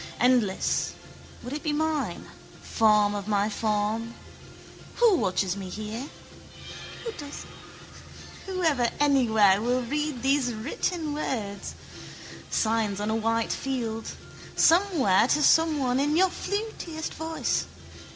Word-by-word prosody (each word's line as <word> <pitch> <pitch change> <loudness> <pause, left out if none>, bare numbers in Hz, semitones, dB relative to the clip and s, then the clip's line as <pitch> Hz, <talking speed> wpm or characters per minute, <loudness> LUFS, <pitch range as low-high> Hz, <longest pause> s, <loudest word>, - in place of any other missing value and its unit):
Endless, 240 -6 +2 0.5
would 250 +3 -6
it 295 - -4
be 305 - -1
mine, 315 0 -1 0.4
form 210 -2 +3
of 205 -1 -5
my 205 0 +1
form? 215 +2 -1 0.8
Who 465 -5 +5
watches 185 - 0
me 195 -2 -6
here? 215 +7 -6 2.4
Who 370 -1 -3
ever 265 -8 +2
anywhere 220 -9 +4
will 245 +2 0
read 295 0 -3
these 270 -2 +2
written 305 +7 -3
words? 215 -9 -4 0.7
Signs 220 -3 0
on 210 +1 -1
a - - 0
white 225 +1 0
field. 230 -4 -3 0.5
Somewhere 325 - +4
to 300 +3 +2
someone 290 -7 +3
in 295 +3 +1
your 375 0 +4
flutiest 400 -7 -4
voice. 320 0 -2
245 Hz, 110 wpm, -26 LUFS, 215-300 Hz, 2.4 s, Who